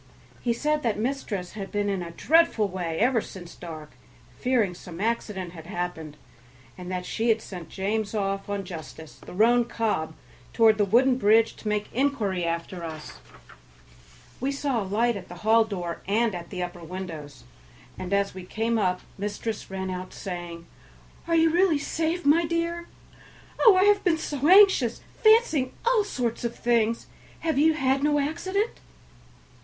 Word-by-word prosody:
He 240 - 0
said 300 +6 0
that 230 -6 0
mistress 215 -6 -3
had 195 -2 -7
been 205 -1 0
in 195 -2 -1
a 170 - -5
dreadful 250 - +3
way 175 -4 -4
ever 240 +2 +3
since 175 -4 -10
dark, 155 -3 -9 0.4
fearing 240 -7 +1
some 175 -1 -10
accident 210 -4 -2
had 165 -2 -11
happened, 175 -5 -5 0.6
and 180 0 -8
that 180 -1 -3
she 230 +4 -1
had 225 0 +4
sent 180 -6 -9
James 205 +2 -2
off 195 -1 -2
on 200 -1 -2
Justice, 160 -2 -9
the - - -11
roan 240 +4 +4
cob, 210 -10 -2 0.4
toward 220 -2 +5
the 205 - +4
wooden 250 +5 +4
bridge 225 +1 +4
to - - -8
make 210 0 -2
inquiry 225 -9 0
after 170 +1 -3
us. 155 -2 -8 1.2
We 265 +3 -1
saw 275 -4 -1
a - - -4
light 230 +3 +2
at 185 -2 -7
the 175 - -9
hall 225 +1 +5
door 180 -5 -5
and 220 +2 +2
at 175 -1 -7
the 180 -2 -3
upper 175 -1 -7
windows, 160 -7 -7 0.5
and 185 0 -6
as 200 0 +1
we 185 0 -8
came 225 +4 -1
up 180 -3 0 0.2
mistress 210 +2 -4
ran 190 -1 -4
out, 185 0 -6
saying, 175 -2 -6 0.6
"Are 335 - +2
you 325 0 +4
really 350 -2 +3
safe, 325 +3 -2
my 310 +4 +5
dear? 335 +1 -2 0.7
Oh! 440 -5 +7
I 370 - +5
have 410 0 +4
been 345 -4 +3
so 290 -2 -2
anxious, 375 - +6 0.2
fancying 435 - +4
all 470 -3 +4
sorts 245 - -3
of 235 0 -2
things. 230 -1 +1 0.4
Have 320 -4 0
you 315 +2 +5
had 270 -2 +1
no 295 0 +3
accident?" 375 +9 -1
215 Hz, 170 wpm, -26 LUFS, 180-275 Hz, 1.2 s, Oh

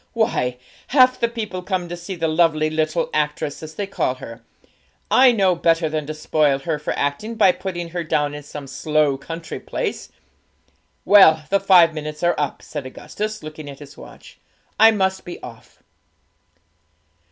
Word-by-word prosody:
Why, 170 - 0 0.3
half 255 -1 +4
the 235 - +2
people 215 -6 -5
come 180 -1 -2
to 175 - -5
see 175 +2 -7
the 165 -1 -1
lovely 155 -1 +2
little 155 +1 -1
actress, 150 -1 -2
as 155 0 -9
they 205 - -3
call 160 -9 -1
her; 115 -2 -10 0.7
I 260 -1 +7
know 195 -5 +3
better 165 -1 +1
than 155 -1 -3
to 155 - -5
spoil 150 -2 +1
her 150 +2 -3
for 150 - -3
acting 145 +11 -2
by 210 -4 +5
putting 175 -2 -5
her 175 0 -4
down 150 -2 0
in 150 - -7
some 145 0 -9
slow 150 +1 0
country 165 +5 -7
place. - - -4 1.0
Well, 160 -7 +6
the 200 - +4
five 180 -4 +5
minutes 150 +1 -6
are 175 0 +3
up,' 145 -2 -3
said 145 -4 -6
Augustus, 215 +9 -6
looking 155 -1 -8
at 140 - -9
his 145 -1 -13
watch; - - -14 0.4
'I 220 +1 +8
must 190 -2 0
be 175 - -8
off.' 115 -2 -13
160 Hz, 170 wpm, -21 LUFS, 150-190 Hz, 1.0 s, I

